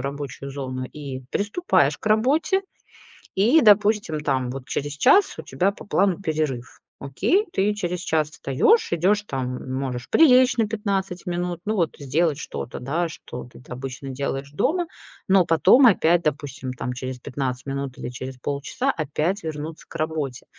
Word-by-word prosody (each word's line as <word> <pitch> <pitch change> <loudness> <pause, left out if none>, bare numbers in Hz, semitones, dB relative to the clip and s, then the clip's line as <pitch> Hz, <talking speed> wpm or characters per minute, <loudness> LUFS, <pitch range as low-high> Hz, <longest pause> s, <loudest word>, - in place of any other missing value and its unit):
рабочую 140 0 -5
зону 130 -2 -4
и 135 -1 -7
приступаешь 210 - +1
к - - -13
работе. 270 - +3 0.7
И, 235 +12 +5
допустим, 205 -6 +4
там, 130 -4 0
вот 130 0 -7
через 145 0 -2
час 390 - +4
у - - -5
тебя 190 +2 0
по - - -12
плану 195 -3 +2
перерыв. 155 -8 -3 0.2
Окей, 355 - +1
ты 205 +2 +2
через 180 -4 -3
час 155 -4 0
встаёшь, 160 - +2
идёшь, 195 +5 +2
там, 130 -5 -4
можешь 130 -2 -4
прилечь 255 -5 +6
на 220 -2 +2
15 195 -4 -2
минут. 175 -1 -2
Ну, 215 +1 -1
вот, 170 -4 0
э, 140 - -9
сделать 155 +2 +1
что-то, 70 - -6
да, 165 +7 -1
что 125 -5 -8
ты 125 - -15
тат - - -18
обычно 135 +1 -6
делаешь 135 +1 -3
дома, 340 - +1 0.4
но 190 -2 +5
потом 245 - +6
опять, 175 -5 +4
допустим, 135 -3 -3
там, 125 0 -4
через 130 0 -5
15 125 -1 -4
минут 135 -1 -4
или - - -5
через 130 +1 -7
полчаса 145 - -2
опять 155 +6 -2
вернуться 155 +1 -6
к - - -14
работе. 155 -5 -3
155 Hz, 165 wpm, -23 LUFS, 135-200 Hz, 0.7 s, прилечь